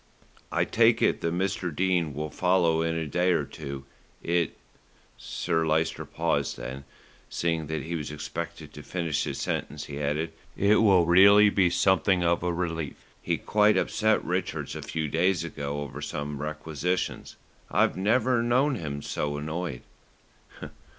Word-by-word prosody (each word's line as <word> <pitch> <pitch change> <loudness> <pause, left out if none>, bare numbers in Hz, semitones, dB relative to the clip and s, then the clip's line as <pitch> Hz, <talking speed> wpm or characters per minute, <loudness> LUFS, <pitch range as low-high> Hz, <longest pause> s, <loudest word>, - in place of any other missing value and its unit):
"I - - +1
take 115 0 +3
it - - +2
that 85 - 0
Mr. 95 -1 -1
Dene 85 -2 0
will 75 0 -4
follow 90 -3 +2
in 80 0 0
a 80 -1 -2
day 90 +5 +1
or - - 0
two. 70 -2 -8 0.4
It 85 0 0 0.4
" - - -33
Sir 80 -2 -1
Lyster 80 +1 0
paused; - - -1
then, 65 +2 -7 0.4
seeing 80 -2 -1
that 80 -1 -3
he 85 - -5
was 75 -3 -3
expected 80 +1 -6
to 75 - -9
finish 80 0 -2
his - - -4
sentence, 75 0 -3
he 70 0 -6
added, 75 +3 -1 0.2
"It 100 +2 +4
will 95 -6 +5
really 100 +4 +7
be 95 -3 +3
something 95 0 +2
of 85 0 +2
a 90 0 0
relief. 80 -3 -3 0.3
He - - -1
quite 105 0 +3
upset 110 0 +1
Rickards 90 +1 -2
a - - -5
few 80 -1 -3
days 85 +3 +1
ago 75 -3 -4
over 70 0 -7
some 75 -1 -4
requisitions. 75 +3 -3 0.3
I've - - +2
never 120 +5 +2
known 130 +5 +2
him 70 -5 -5
so 75 0 -2
annoyed." 80 -2 -4
85 Hz, 155 wpm, -27 LUFS, 75-95 Hz, 0.4 s, really